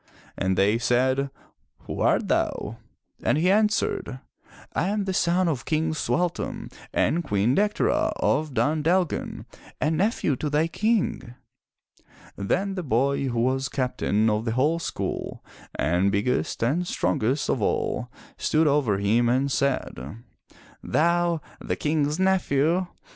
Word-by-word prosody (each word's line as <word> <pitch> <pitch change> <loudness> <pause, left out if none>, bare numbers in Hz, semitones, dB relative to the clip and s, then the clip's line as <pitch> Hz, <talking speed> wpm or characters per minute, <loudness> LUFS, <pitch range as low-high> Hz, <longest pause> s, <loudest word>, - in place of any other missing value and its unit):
'' - - -26
And 95 -1 0
they 105 +4 +3
said, 130 +3 +1 0.5
"Who - - -6
art - - +2
thou?" - - -1 0.4
And - - +2
he 180 +4 +3
answered, 210 - +1 0.3
" - - -22
I - - 0
am 205 0 -1
the 190 - -2
son 180 +1 +2
of 140 -6 -1
King 160 0 0
Sualtam 175 +2 -2 0.2
and 170 +2 +1
Queen 105 -3 +1
Dectera 210 +3 +1
of 155 -4 0
Dun 150 +3 +1
Dalgan 175 +2 0 0.3
and 155 +2 +1
nephew 190 - +1
to 150 - -2
thy 150 +2 +2
King." 205 - -1 1.0
Then 190 - -1
the 190 - -3
boy 140 0 +1
who 120 -2 -1
was 130 +2 0
Captain 125 -5 0
of 105 +1 0
the 115 - -1
whole 150 +7 +2
school - - -4 0.3
and 90 +5 +1
biggest 110 +4 0
and 160 +9 +1
strongest 115 - 0
of 120 - 0
all - - -1 0.3
stood 160 +1 +2
over 140 -9 +2
him 110 +4 +2
and 135 +3 +1
said: 115 - -2 0.7
"Thou, 170 0 +1 0.2
the - - -1
King's 150 0 0
nephew! 180 -2 +2
145 Hz, 140 wpm, -25 LUFS, 120-170 Hz, 1.0 s, they